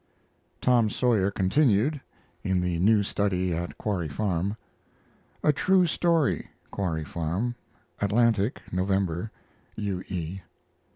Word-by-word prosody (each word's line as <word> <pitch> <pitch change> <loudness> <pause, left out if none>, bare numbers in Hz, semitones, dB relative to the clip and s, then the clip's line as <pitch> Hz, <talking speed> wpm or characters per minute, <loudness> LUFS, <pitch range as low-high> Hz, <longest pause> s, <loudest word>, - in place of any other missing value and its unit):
TOM 120 -3 +4
SAWYER 110 -5 +2
continued 115 +7 +2 0.4
(in 95 -1 +1
the 90 -2 -1
new 105 +3 +4
study 95 -3 0
at 85 +2 -4
Quarry 95 -6 -2
Farm). 95 +4 -1 0.9
A 150 - +4
TRUE 185 +5 +3
STORY 165 -2 +1 0.2
(Quarry 80 -6 -2
Farm) 85 +11 -2 0.5
Atlantic, 110 +1 +2
November. 95 0 0 0.5
U. 100 -4 -3
E. 90 0 -4
100 Hz, 105 wpm, -27 LUFS, 90-115 Hz, 0.9 s, TOM